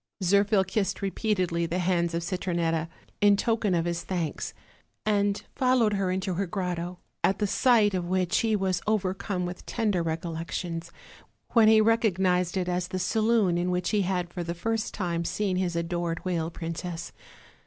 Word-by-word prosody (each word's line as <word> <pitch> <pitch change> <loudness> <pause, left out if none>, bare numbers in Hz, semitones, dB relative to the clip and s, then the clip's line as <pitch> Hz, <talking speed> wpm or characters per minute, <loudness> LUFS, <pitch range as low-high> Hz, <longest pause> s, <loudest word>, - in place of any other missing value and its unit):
Zirphil 200 +2 +4
kissed 195 +1 -2
repeatedly 185 -4 0
the 170 - -2
hands 175 -2 +1
of 170 - -1
Citronetta, 170 -3 -1 0.3
in 205 -1 +6
token 220 -4 +1
of 165 -1 +1
his 170 0 -1
thanks, 170 -6 -3 0.5
and 205 -1 +1
followed 250 -4 +3
her 195 -2 0
into 185 +1 -1
her 195 +2 -1
grotto, 180 -1 -3 0.3
at 195 - +3
the 210 - 0
sight 215 -1 +4
of 180 -2 -1
which 185 -1 +1
he 225 -1 +2
was 190 -3 0
overcome 195 -2 -1
with 175 0 -6
tender 210 -6 0
recollec 165 0 -3
tions, 170 -1 -4 0.6
when 230 -2 +6
he 220 0 +7
recognized 190 -5 +2
it 180 -1 -1
as 180 0 -1
the 185 - -4
saloon 215 -2 +2
in 175 +1 0
which 180 0 0
he 210 -2 +2
had 180 -2 -1
for 175 - -3
the 170 0 -4
first 225 +5 -2
time 170 -4 -1
seen 190 +1 -1
his 180 -2 -1
adored 170 0 -2
whale 170 -3 -1
princess. 165 0 -5
185 Hz, 170 wpm, -27 LUFS, 170-205 Hz, 0.6 s, he